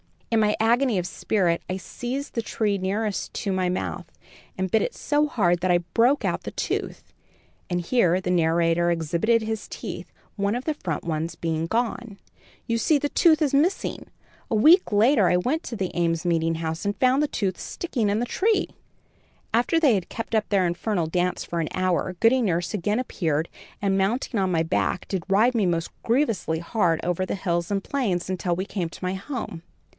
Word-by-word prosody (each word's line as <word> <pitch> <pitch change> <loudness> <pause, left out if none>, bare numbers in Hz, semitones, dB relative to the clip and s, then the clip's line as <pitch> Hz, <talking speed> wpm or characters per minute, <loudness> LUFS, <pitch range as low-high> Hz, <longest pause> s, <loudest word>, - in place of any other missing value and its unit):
"In 225 - +3
my 210 -1 +3
agony 235 0 +3
of 180 - -1
spirit, 180 -3 0
I 185 - -1
seized 245 +9 -5
the 230 - -1
tree 215 -2 -1
nearest 200 +2 -2
me - - 0
in 190 - 0
my 185 -1 +1
mouth, 180 +1 -3 0.5
and 190 -1 -2
bit 220 - +3
it - - -2
so 295 0 +1
hard 175 - +1
that 185 +1 -1
I 175 -1 +4
broke 250 +5 +3
out - - -1
the - - -5
tooth," - - -4 0.6
and 175 -1 0
here 180 -2 +2
the 180 -1 -2
narrator 170 0 +2
exhibited 170 +8 +1
his 220 -1 -4
teeth, - - -7 0.3
one 200 +2 0
of 245 - -3
the 310 - -1
front 170 - -4
ones 165 0 -3
being 165 -1 -2
gone. 230 0 -2 0.5
"You 230 - 0
see 305 +5 +3
the 290 +1 -1
tooth 320 0 +4
is 285 - 0
missing. 315 +7 0 0.4
A 225 - 0
week 320 - +6
later 215 0 +4
I 180 - +3
went 280 - -1
to 235 - -6
the 190 -4 -2
Ames 165 -1 0
Meeting 165 -1 +1
House 160 0 -3
and 205 0 -1
found 260 +2 +3
the 300 - +2
tooth 195 -8 -2
sticking 240 -11 -2
in 205 +2 +1
the 240 - 0
tree. 420 - +1 0.8
"After 245 +8 +3
they 290 -7 +4
had 185 -3 -3
kept 225 - -6
up 215 -1 +2
their 195 -3 +3
infernal 175 0 -1
dance 180 +2 -1
for 170 - -4
an 160 - -1
hour, 185 0 0
Goody 250 +3 +5
Nurse 175 -5 0
again 210 +3 0
appeared 165 - -1 0.3
and, 195 -1 +1
mounting 220 +4 0
on 190 -1 +1
my 165 -3 +1
back, 165 +2 -1
did 185 -4 -2
ride 215 +6 +4
me 220 -4 +2
most 170 -2 -1
grievously 230 - +1
hard 170 -2 0
over 180 +1 0
the - - -3
hills 170 -3 -1
and 200 -1 -1
plains, 195 -11 -1
until 180 -1 -1
we 185 +2 -3
came 180 -5 -3
to 170 - -12
my 185 - -1
home. 195 - -5
195 Hz, 200 wpm, -25 LUFS, 175-235 Hz, 0.8 s, week